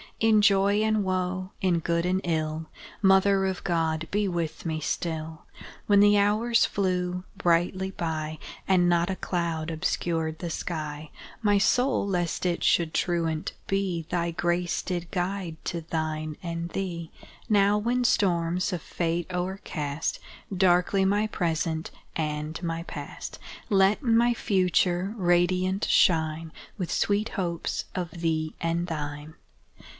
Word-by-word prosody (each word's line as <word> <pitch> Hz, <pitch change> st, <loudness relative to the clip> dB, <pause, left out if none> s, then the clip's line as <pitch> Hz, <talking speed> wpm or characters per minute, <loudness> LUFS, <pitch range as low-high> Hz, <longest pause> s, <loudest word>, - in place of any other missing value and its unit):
In 220 Hz, -1 st, +5 dB
joy 200 Hz, 0 st, +4 dB
and 215 Hz, -1 st, +2 dB
woe 185 Hz, 0 st, -2 dB
in 180 Hz, -3 st, +2 dB
good 170 Hz, +1 st, 0 dB
and 185 Hz, +1 st, +1 dB
ill 160 Hz, -1 st, -1 dB, 0.4 s
Mother 195 Hz, 0 st, +5 dB
of 190 Hz, -1 st, -2 dB
God, 160 Hz, -2 st, 0 dB
be 205 Hz, 0 st, +1 dB
with 170 Hz, -3 st, -3 dB
me 160 Hz, -1 st, -1 dB
still! 160 Hz, 0 st, -3 dB, 0.4 s
When 205 Hz, -1 st, +5 dB
the 205 Hz, 0 st, +6 dB
hours 215 Hz, +4 st, +3 dB
flew 180 Hz, -2 st, -1 dB
brightly 185 Hz, +1 st, +1 dB
by, 155 Hz, -3 st, -3 dB, 0.3 s
And 180 Hz, -2 st, +4 dB
not 170 Hz, 0 st, +2 dB
a -, -, -2 dB
cloud 170 Hz, -3 st, -2 dB
obscured 160 Hz, -1 st, -1 dB
the 175 Hz, -, -4 dB
sky, 155 Hz, -2 st, -4 dB, 0.3 s
My 205 Hz, -1 st, +4 dB
soul, 250 Hz, +2 st, +2 dB
lest 175 Hz, -2 st, -1 dB
it 175 Hz, -1 st, -1 dB
should 165 Hz, -2 st, +3 dB
truant 165 Hz, -3 st, 0 dB
be, 190 Hz, -4 st, -1 dB
Thy 170 Hz, -1 st, 0 dB
grace 175 Hz, +1 st, 0 dB
did 175 Hz, -2 st, -3 dB
guide 180 Hz, -2 st, -2 dB
to 170 Hz, -, -2 dB
thine 155 Hz, -1 st, -3 dB
and 170 Hz, -1 st, -4 dB
thee; 170 Hz, -3 st, -4 dB, 0.4 s
Now, 205 Hz, -1 st, +4 dB
when 245 Hz, +3 st, 0 dB
storms 180 Hz, -4 st, +1 dB
of 175 Hz, -, -3 dB
Fate 170 Hz, 0 st, -2 dB
o'ercast 175 Hz, -5 st, -3 dB, 0.4 s
Darkly 180 Hz, +1 st, +3 dB
my 205 Hz, +2 st, +2 dB
Present 165 Hz, -4 st, -1 dB, 0.3 s
and 150 Hz, 0 st, -3 dB
my 165 Hz, -1 st, -3 dB
Past, -, -, -7 dB, 0.3 s
Let 195 Hz, +3 st, +4 dB
my 240 Hz, -1 st, +4 dB
Future 185 Hz, -1 st, +1 dB
radiant 180 Hz, +1 st, +2 dB
shine 160 Hz, -1 st, +2 dB, 0.3 s
With 180 Hz, -3 st, -3 dB
sweet 205 Hz, +2 st, +1 dB
hopes 170 Hz, -5 st, -2 dB
of 180 Hz, -2 st, -3 dB
thee 160 Hz, -1 st, -1 dB
and 170 Hz, +1 st, 0 dB
thine! 150 Hz, -1 st, -5 dB
175 Hz, 135 wpm, -27 LUFS, 165-195 Hz, 0.4 s, the